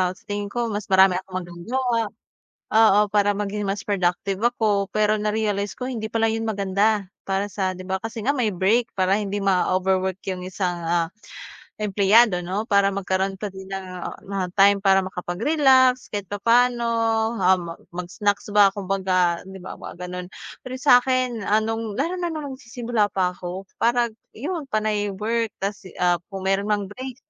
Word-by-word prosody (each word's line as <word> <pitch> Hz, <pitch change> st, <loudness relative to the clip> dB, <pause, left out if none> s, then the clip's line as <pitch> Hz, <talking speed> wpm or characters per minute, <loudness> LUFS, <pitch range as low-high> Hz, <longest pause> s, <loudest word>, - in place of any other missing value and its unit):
sa -, -, -22 dB
tingin 205 Hz, 0 st, -4 dB
ko 235 Hz, +2 st, -2 dB
mas 205 Hz, 0 st, -4 dB
marami 190 Hz, -1 st, +5 dB
akong 185 Hz, -1 st, -6 dB
magagawa. 230 Hz, +7 st, -2 dB, 0.6 s
Oo, 220 Hz, -2 st, +6 dB
para 205 Hz, -1 st, +3 dB
maging 205 Hz, 0 st, -3 dB
mas 195 Hz, 0 st, -2 dB
productive 195 Hz, 0 st, -1 dB
ako. 215 Hz, -4 st, +1 dB
Pero 215 Hz, 0 st, +2 dB
na-realize 210 Hz, -1 st, -1 dB
ko 255 Hz, +1 st, -4 dB
hindi 220 Hz, -3 st, -3 dB
pala 225 Hz, 0 st, +1 dB
'yon 225 Hz, 0 st, -2 dB
maganda, 205 Hz, +1 st, +1 dB, 0.2 s
para 195 Hz, +1 st, -1 dB
sa 185 Hz, -1 st, -1 dB
'di 185 Hz, -, -9 dB
ba, 190 Hz, +1 st, -2 dB
kasi 225 Hz, +1 st, -6 dB
nga 270 Hz, -, +3 dB
may 255 Hz, -5 st, 0 dB
break 210 Hz, +5 st, +2 dB
para 190 Hz, +2 st, +2 dB
hindi 205 Hz, -1 st, -3 dB
ma-overwork 190 Hz, 0 st, +1 dB
'yong 185 Hz, -1 st, -4 dB
isang, 180 Hz, -2 st, -2 dB
ah, 170 Hz, -1 st, +1 dB, 0.7 s
empleyado 205 Hz, -1 st, +4 dB
'no, 200 Hz, +6 st, -3 dB
para 200 Hz, -1 st, +3 dB
magkaroon 190 Hz, 0 st, -1 dB
pa 210 Hz, -, -2 dB
din 190 Hz, 0 st, -10 dB
ng, 195 Hz, -1 st, -4 dB, 0.2 s
ah, -, -, -4 dB
ng 190 Hz, -2 st, -4 dB
time 200 Hz, +1 st, +4 dB
para 195 Hz, -1 st, +5 dB
makapag-relax 255 Hz, -, +2 dB
kahit 205 Hz, -3 st, -4 dB
papaano, 235 Hz, +4 st, +2 dB, 0.6 s
um, 180 Hz, -2 st, +2 dB, 0.2 s
mag-snacks 195 Hz, +4 st, -2 dB
ba 205 Hz, -1 st, +7 dB
kumbaga 185 Hz, -3 st, +1 dB
'di 190 Hz, -, -9 dB
ba -, -, -8 dB
mga -, -, -8 dB
gano'n. 180 Hz, 0 st, -6 dB, 0.3 s
Pero 255 Hz, 0 st, -6 dB
sakin, 255 Hz, -3 st, +3 dB
ah, 210 Hz, -, +4 dB
no'ng 225 Hz, -1 st, -3 dB
lalo 325 Hz, +7 st, -1 dB
na 350 Hz, -, -1 dB
no'ng 305 Hz, -4 st, -5 dB
nagsisimula 235 Hz, -4 st, -1 dB
pa 180 Hz, -1 st, +2 dB
ako 180 Hz, +1 st, -7 dB, 0.2 s
parang 235 Hz, -1 st, +2 dB, 0.2 s
'yon 300 Hz, +3 st, -4 dB
panay 215 Hz, -2 st, 0 dB
work 225 Hz, +4 st, -1 dB
tas, 200 Hz, -1 st, -5 dB
ah, 175 Hz, -1 st, +2 dB
kung 195 Hz, -1 st, -7 dB
meron 195 Hz, +2 st, +1 dB
mang 205 Hz, -1 st, +1 dB
break, 250 Hz, +6 st, -8 dB
205 Hz, 165 wpm, -23 LUFS, 190-225 Hz, 0.7 s, ba